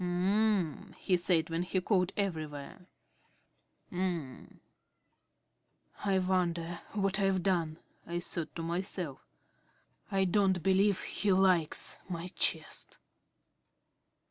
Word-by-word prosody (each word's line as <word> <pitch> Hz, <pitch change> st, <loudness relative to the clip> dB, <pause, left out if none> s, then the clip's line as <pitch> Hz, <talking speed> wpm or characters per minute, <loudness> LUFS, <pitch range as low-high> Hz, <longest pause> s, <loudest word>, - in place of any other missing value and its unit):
"Um," 185 Hz, -1 st, +1 dB
he 185 Hz, -, +2 dB
said 170 Hz, -2 st, +2 dB
when 165 Hz, +1 st, 0 dB
he 185 Hz, +1 st, 0 dB
called 185 Hz, -1 st, +1 dB
everywhere, 160 Hz, -3 st, -4 dB, 1.0 s
"um." 175 Hz, -7 st, -3 dB, 1.4 s
"I 195 Hz, -2 st, +2 dB
wonder 175 Hz, -2 st, 0 dB
what 195 Hz, -1 st, +1 dB
I've 195 Hz, -2 st, +2 dB
done," 170 Hz, -5 st, +1 dB, 0.3 s
I 175 Hz, 0 st, -2 dB
thought 170 Hz, -2 st, -4 dB
to 165 Hz, -, -4 dB
myself. 170 Hz, -3 st, -3 dB, 0.9 s
"I 195 Hz, -1 st, +2 dB
don't 190 Hz, -2 st, +2 dB
believe 195 Hz, +1 st, +3 dB
he 200 Hz, 0 st, 0 dB
likes 185 Hz, -4 st, +2 dB
my 175 Hz, 0 st, -4 dB
chest." -, -, -1 dB
180 Hz, 100 wpm, -32 LUFS, 170-195 Hz, 1.4 s, believe